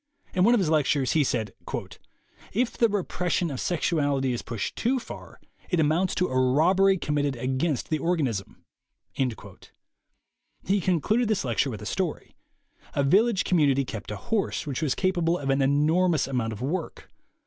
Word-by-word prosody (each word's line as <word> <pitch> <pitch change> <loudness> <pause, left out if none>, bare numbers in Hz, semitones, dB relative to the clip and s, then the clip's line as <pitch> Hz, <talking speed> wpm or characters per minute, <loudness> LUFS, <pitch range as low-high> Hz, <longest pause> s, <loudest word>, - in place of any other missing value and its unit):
In 180 - +2
one 235 +5 +5
of - - +2
his 170 -5 +1
lec 155 -3 +3
tures, 135 -3 +1
he 155 - +3
said: 110 -6 -2 1.0
"If 235 +3 0
the 230 - +3
repression 180 -4 -1
of 130 - -5
sexuality 145 -6 0
is 120 - -3
pushed 115 -4 -4
too 260 +3 +1
far 245 - -9 0.3
it 175 - +1
amounts 160 +5 +2
to 180 - +1
a 130 0 +1
robbery 180 +9 +4
committed 145 -4 -1
against 130 +5 -2
the 155 - +1
organism." 140 - -2 0.5
He 135 - -6
concluded 200 - +1
this 210 -8 0
lecture 125 +3 +1
with 110 -6 -6
a - - -7
story. - - -3 0.6
A 140 - +2
village 200 +8 +3
community 140 -6 +2
kept 110 -4 -7
a 105 - -4
horse 205 - -2
which 140 -1 -3
was 145 -5 0
capable 175 -3 +1
of 140 -3 -1
an 135 +1 +2
enormous 155 +4 +2
amount 125 -4 -2
of 110 +3 -7
work. 165 +5 -4
155 Hz, 165 wpm, -26 LUFS, 130-185 Hz, 1.0 s, one